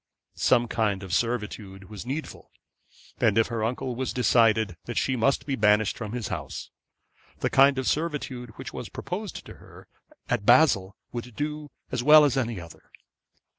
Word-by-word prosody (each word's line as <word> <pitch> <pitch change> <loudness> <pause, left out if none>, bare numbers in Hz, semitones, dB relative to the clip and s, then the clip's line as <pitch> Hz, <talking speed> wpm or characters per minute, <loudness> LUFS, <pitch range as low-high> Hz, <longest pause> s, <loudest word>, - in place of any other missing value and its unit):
Some 120 -2 +2
kind 105 -4 -1
of 95 -2 -6
servitude 105 -3 -2
was 105 +3 -8
needful, 145 +4 -6 0.7
and 110 -3 +3
if 115 - +3
her 115 -2 -2
uncle 125 +2 -2
was 130 +1 -2
decided 110 -5 +3
that 120 - -5
she 130 - +1
must 130 +3 +1
be 140 - -1
banished 105 -2 +3
from 110 -2 -6
his 120 -4 -3
house, - - -6 0.7
the - - 0
kind 135 0 +5
of 130 - -2
servitude 145 -6 -2
which - - -8
was - - -6
proposed 200 +4 -6
to - - -11
her - - -16 0.4
at 120 -4 -1
Basle 120 -6 +4 0.2
would 120 -1 -7
do 150 0 -4 0.2
as 125 -2 -1
well 150 +3 +8
as 140 - +1
another. 110 - -4
120 Hz, 165 wpm, -26 LUFS, 110-135 Hz, 0.7 s, well